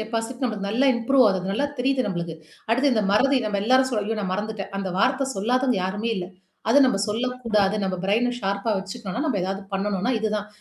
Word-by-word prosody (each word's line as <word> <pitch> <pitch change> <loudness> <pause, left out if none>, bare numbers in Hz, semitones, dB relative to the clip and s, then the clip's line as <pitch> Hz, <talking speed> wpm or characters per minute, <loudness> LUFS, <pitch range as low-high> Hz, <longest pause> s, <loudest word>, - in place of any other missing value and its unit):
Capacity 225 +3 -4
நம்மக்கு 210 -5 -2
நல்லா 255 +6 +3
improve 255 +2 +4
ஆகுது. 190 -1 -1
நல்லா 280 +8 0
தெரியுது 260 0 +1
நம்மளுக்கு. 170 -4 -3 0.4
அடுத்து 265 +4 +3
இந்த 215 -2 +1
மறதி 270 +6 +4
நம்ம 205 -1 -1
எல்லாரும் 260 +4 +4
சொல்ல 215 -4 0
ஐயோ 225 +1 -1
நான் 190 -2 -2
மறந்துட்டேன். 210 0 -4
அந்த 195 -1 -3
வார்த்த 265 +5 +2
சொல்லாதவங்க 250 +3 +1
யாருமே 205 +5 -2
இல்ல. 180 -2 -3 0.4
அது 285 - +6
நம்ம 250 -6 +1
சொல்லக்கூடாது. 225 -3 0
நம்ம 185 -1 -1
பிரைன 230 +5 +2
ஷார்பா 200 +2 -1
வச்சுக்கணோம்னா 200 +5 -5
நம்ம 260 -10 0
எதாவது 195 +2 -3
பண்ணணும்னா 200 +4 0
இதுதான். 215 -1 -2
220 Hz, 185 wpm, -24 LUFS, 195-250 Hz, 0.4 s, அது